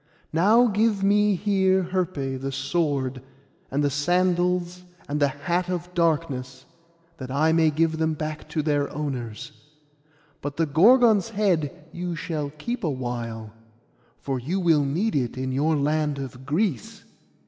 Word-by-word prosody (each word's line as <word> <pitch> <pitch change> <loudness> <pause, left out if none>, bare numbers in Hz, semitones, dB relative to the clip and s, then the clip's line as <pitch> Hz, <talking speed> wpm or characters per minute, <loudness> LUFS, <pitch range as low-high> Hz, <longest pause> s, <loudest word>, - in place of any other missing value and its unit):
Now 210 +9 +5
give 210 -2 +1
me 205 0 +3
here 190 -1 +2
Herpé 145 -8 -2
the 135 0 -3
sword, 135 -4 -1 0.5
and 140 +2 0
the 145 - +1
sandals, 180 +3 +1 0.3
and 145 +1 -2
the 145 - +4
hat 175 +6 -2
of 180 0 -4
darkness, 140 -6 -1 0.5
that 130 -3 -7
I 150 +4 +2
may 160 -1 +4
give 160 +1 0
them 160 -1 +1
back 155 0 -5
to 155 - -1
their 145 -2 +1
owners; 130 -7 -5 0.9
but 145 0 -5
the 165 - +2
Gorgon's 220 - +5
head 180 -10 -1
you 175 0 -4
shall 155 -3 -3
keep 225 - -5
a 165 - +1
while, 120 -4 -5 0.6
for 135 -2 -3
you 165 +11 -2
will 165 -5 +3
need 170 +11 -1
it 125 -3 -1
in 130 0 -2
your 150 +5 +1
land 150 0 0
of 130 -1 -8
Greece. 155 - -1
155 Hz, 150 wpm, -25 LUFS, 140-180 Hz, 0.9 s, Now